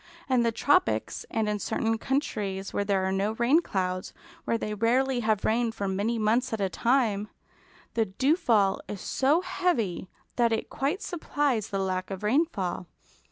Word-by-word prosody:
In 255 -2 +3
the 230 0 +2
tropics, 290 +10 +1
and 220 -1 0
in 210 0 -1
certain 225 +3 -1
countries 205 -9 -2
where 205 - 0
there 195 -2 +1
are 190 - 0
no 195 +3 0
rain 250 +8 +3
clouds; 185 - -2 0.3
where 230 - +1
they 210 -1 -3
rarely 245 +4 +2
have 215 -3 0
rain 230 +1 +2
for 205 -3 -4
many 205 +5 0
months 225 +4 +1
at 220 - -1
a 195 -1 0
time, 215 +1 +1 0.7
the 225 -1 +2
dewfall 220 - +2
is 205 - -6
so 285 - +2
heavy 240 - -1 0.3
that 235 -2 +3
it 225 - -2
quite 290 +9 -1
supplies 290 - -1
the 200 - -2
lack 185 -1 -2
of 195 0 -6
rainfall. 210 - 0
225 Hz, 165 wpm, -27 LUFS, 195-260 Hz, 0.7 s, In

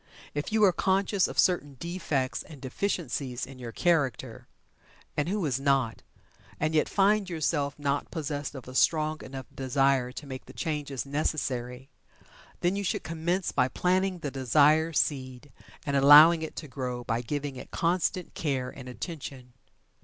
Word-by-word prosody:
If 145 +6 -3
you 220 0 +3
are 195 - +7
conscious 190 +2 +1
of - - -8
certain 145 -6 +2
defects 160 -7 -2
and 150 -4 -12
deficiencies 130 -3 -3
in 135 -1 -12
your 120 -2 -6
character 145 -3 0 0.7
(and 150 +3 0
who 200 -2 -1
is 135 -3 0
not?) 135 -4 +1 0.6
and 155 +1 0
yet 155 - +2
find 200 0 +3
yourself 150 -4 -1
not 145 -1 -1
possessed 145 -3 -4
of 130 -3 -9
a 130 - -8
strong 155 +2 +2
enough 130 0 -7
desire 135 -1 +1
to 150 - -8
make 130 -2 -8
the - - -11
changes 145 -6 -3
necessary, 135 -3 -2 0.7
then 175 +2 +2
you 200 - -2
should 185 - -1
commence 170 +3 -1
by 125 -2 +2
planting 185 +6 +1
the 150 -5 -5
desire 150 +5 +4
seed 130 -3 -2 0.3
and 140 - -1
allowing 150 +4 +8
it 160 - -6
to 155 - -6
grow 125 -2 -4
by 115 0 -1
giving 145 +2 -4
it 125 - -9
constant 175 +1 0
care 130 -5 -2
and 130 -2 -10
attention. 130 -3 -7
145 Hz, 160 wpm, -28 LUFS, 130-165 Hz, 0.7 s, allowing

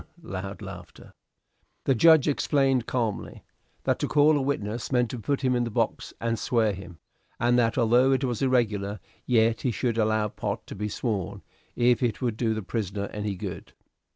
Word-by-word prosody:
(Loud 95 - -6
laughter.) - - -10 0.7
The 135 - +4
judge 160 +4 +6
explained, 135 -4 +2
calmly, 115 -5 -3 0.4
that - - +1
to - - -1
call 150 +1 +4
a 145 - +1
witness 120 -4 -2
meant 125 -2 +2
to 125 - -5
put 140 +5 -1
him 130 -2 +2
in 120 - +1
the 120 - -2
box - - -1
and 115 -1 -1
swear 110 -3 +1
him, 95 -2 -10 0.4
and 120 +2 +3
that 115 0 +1
although 125 +2 +4
it 135 +1 +1
was 120 -4 -1
irregular, 105 -6 +1 0.3
yet 115 -2 +3
he 130 - 0
should 115 -1 -1
allow 110 0 +2
Pott - - -4
to - - -8
be 105 +1 -3
sworn, 100 -3 -3 0.3
if 120 -1 +3
it 115 -4 0
would 120 -4 -1
do 110 -1 0
the 110 - -4
prisoner 100 -1 -3
any 105 -1 -3
good. - - -7
115 Hz, 180 wpm, -26 LUFS, 105-130 Hz, 0.7 s, judge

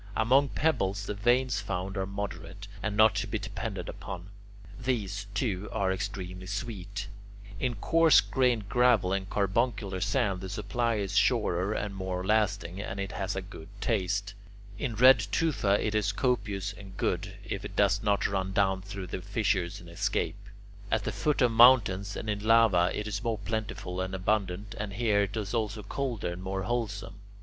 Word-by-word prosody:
Among 135 +5 +4
pebbles 100 -11 0
the 105 - -3
veins 120 +2 +2
found 95 -1 -3
are 95 -1 -2
moderate, 100 -1 -6
and 105 -1 -2
not 110 +1 +6
to - - -1
be - - -2
depended - - -5
upon. 90 +1 -7 0.5
These, 105 -6 -2
too, 100 -3 -1
are 100 -3 0
extremely 95 -1 -4
sweet. 100 -1 -5 0.5
In 125 0 -1
coarse 165 +9 +5
grained 125 -6 +1
gravel 120 -6 +3
and 95 0 -2
carbuncular 100 -2 0
sand 100 -2 0
the 95 - -6
supply 115 +4 -1
is 100 -2 -2
surer 105 -5 +2
and 100 -2 -3
more 95 -1 -3
lasting, 100 -3 +1
and 100 -1 -5
it 95 -1 -3
has 95 0 -3
a 95 - -3
good 95 -4 -11
taste. 100 -1 -1 0.5
In 120 -3 -2
red 125 +2 +8
tufa 110 -7 +2
it 110 - -1
is 105 -1 +1
copious 100 -4 -1
and 95 0 -12
good, - - -1
if - - -4
it - - -7
does - - +3
not 100 -1 +1
run 95 -1 -1
down 95 -2 +2
through 95 0 -6
the 90 +1 -5
fissures 100 -3 -1
and 90 - -13
escape. 85 0 -2 0.4
At - - +1
the - - -2
foot 150 -3 +1
of 120 - +4
mountains 110 -5 +5
and - - -5
in 105 -1 -1
lava 110 -6 +5
it 105 - -3
is 105 +1 -3
more 115 -2 0
plentiful 105 -3 -4
and 95 0 -3
abundant, 100 0 -1
and 105 -1 -4
here 105 -1 +2
it 100 +2 -2
is 105 -1 -3
also 110 -2 -1
colder 120 -3 -3
and 90 - -8
more 95 0 -3
wholesome. 100 -2 -3
100 Hz, 175 wpm, -29 LUFS, 95-110 Hz, 0.5 s, red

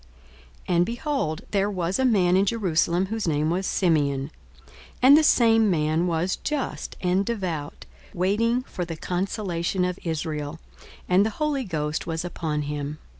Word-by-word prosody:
42:002:025 180 - +1
And, 175 - +4
behold, 235 - -2
there 200 0 +1
was 185 0 -2
a 265 - +3
man 185 -7 +3
in 195 +2 +3
Jerusalem, 180 -4 +1
whose 220 0 -3
name 155 0 +1
was 185 +2 -1
Simeon; 145 -5 +1 0.7
and 265 +3 +8
the 310 - +6
same 225 -7 +4
man 160 0 +1
was 175 +2 0
just 300 -3 -4
and 185 +2 +2
devout, 185 -10 -4 0.3
waiting 225 +7 +1
for 185 - -5
the 165 -2 -6
consolation 180 0 -2
of 180 -1 -3
Israel: 155 -2 -3 0.5
and 185 +2 +4
the 220 - +1
Holy 295 -4 0
Ghost 150 -4 -3
was 165 +1 -3
upon 155 -4 -3
him. 145 0 -4
180 Hz, 155 wpm, -25 LUFS, 160-210 Hz, 0.7 s, and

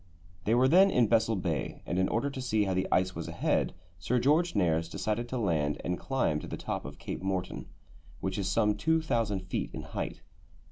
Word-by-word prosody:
They 110 - +3
were 125 +2 +5
then 185 +7 +6
in 125 -10 +4
Bessel 115 0 +3
Bay, 85 -6 -3
and 90 - -1
in 95 - +2
order 140 +5 0
to 130 - -5
see 110 -4 +1
how 95 -2 0
the 95 0 0
ice 95 0 +2
was - - -5
ahead, - - 0 0.2
Sir 115 +9 0
George 150 +7 +3
Nares 85 -4 +2
decided 105 +6 -2
to 130 - -2
land 80 - 0
and 90 0 -1
climb 130 - 0
to - - -8
the - - -5
top - - -4
of - - -8
Cape - - -5
Morton, 95 -1 -3 0.5
which 95 +1 -2
is 95 -1 -1
some 105 +1 +3
2000 115 -8 +1
feet 95 0 -3
in - - -5
height. - - -5
105 Hz, 205 wpm, -30 LUFS, 95-125 Hz, 0.5 s, then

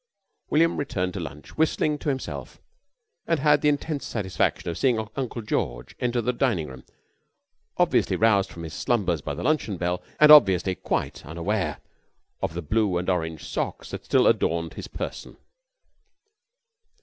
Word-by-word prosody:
William 165 +2 +3
returned 95 -10 -2
to 100 - -4
lunch 75 -3 -8
whistling 155 -1 +1
to - - -2
himself 135 -2 -5 0.7
and 165 -2 +2
had 145 0 +4
the 150 - +4
intense 145 0 -1
satisfaction 95 -5 -1
of 85 - -2
seeing 115 -5 +1
Uncle 125 -3 -4
George - - -3
enter 120 -1 0
the 125 +2 0
dining 115 - 0
room, 65 -1 -11 0.9
obviously - - +2
roused 105 -3 +3
from 85 - -8
his 80 - -7
slumbers 95 - 0
by - - -4
the - - -5
luncheon 150 -11 0
bell, 90 +1 -1 0.2
and 150 0 +8
obviously 95 - +7
quite - - -3
unaware 85 0 -2 0.6
of 80 - -2
the 85 - -4
blue 105 +1 +1
and 90 +2 0
orange 80 -3 -3
socks - - -4
that - - -6
still - - +3
adorned 85 0 +1
his - - -7
person. - - -6
100 Hz, 155 wpm, -25 LUFS, 85-135 Hz, 0.9 s, and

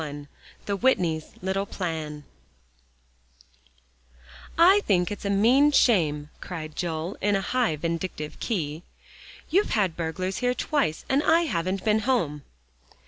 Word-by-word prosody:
XXI 145 -1 -6 0.4
THE 200 -1 -1
WHITNEYS' 175 -10 +1
LITTLE 195 +1 -1
PLAN 160 -6 -4 2.3
"I 365 +5 +7
think 180 -1 +2
it's 205 - -6
a - - 0
mean 245 +9 +4
shame," 155 - +2
cried 155 -4 -7
Joel, 170 +1 -3
on 205 0 +2
a 195 - 0
high 240 -5 0
vindictive 165 -1 -4
key. 160 -8 -3 0.7
"You've 390 +5 +3
had 190 -6 +1
burglars 185 +3 -3
here 250 0 0
twice, 270 - -1
and 270 +2 +2
I 325 +2 +4
haven't 185 - -2
been 215 0 +3
home." 205 - 0
185 Hz, 130 wpm, -26 LUFS, 160-235 Hz, 2.3 s, I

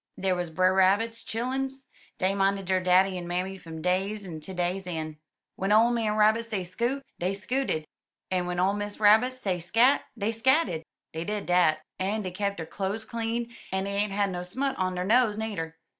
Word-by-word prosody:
Dar 190 -1 +1
wuz 180 0 -1
Brer 185 +3 +3
Rabbit's 205 +5 +2
chil 230 +2 -3
luns; 265 +1 -3 0.3
dey 190 +1 +1
minded 195 0 +1
der 185 0 +2
daddy 185 +1 +3
en 175 - -7
mammy 180 +2 -2
fum 160 -2 -9
day's 195 +3 0
een' 165 -4 -6
ter 170 - -8
day's 180 +2 -1
een\ 155 -3 -4 0.4
Wen 195 +2 -1
ole 225 +3 +6
man 225 -3 0
Rabbit 215 +2 +4
say 215 -5 -3
'scoot,* 235 +10 -2 0.2
dey 185 +3 0
scooted, 210 -6 -1 0.5
en 180 -1 +1
w'en 180 0 -2
ole 190 +2 +3
Miss 205 0 -4
Rabbit 220 +4 +6
say 200 -9 -2
'scat,' 230 +11 +4 0.2
dey 210 +1 0
scatted. 225 - +2 0.3
Dey 160 +1 -3
did 210 +2 -3
dat. 170 -3 +3 0.2
En 205 +3 -1
dey 185 - -4
kep 200 +2 -2
der 165 - -4
cloze 200 +5 -3
clean, 230 0 -2 0.3
en 190 0 0
dey 200 - -3
ain't 205 0 +1
had 200 0 +1
no 175 -1 -3
smut 265 +10 -2
on 185 -1 0
der 180 0 -2
nose 225 0 +3
nudder." 175 -8 -4
195 Hz, 205 wpm, -27 LUFS, 180-220 Hz, 0.5 s, ole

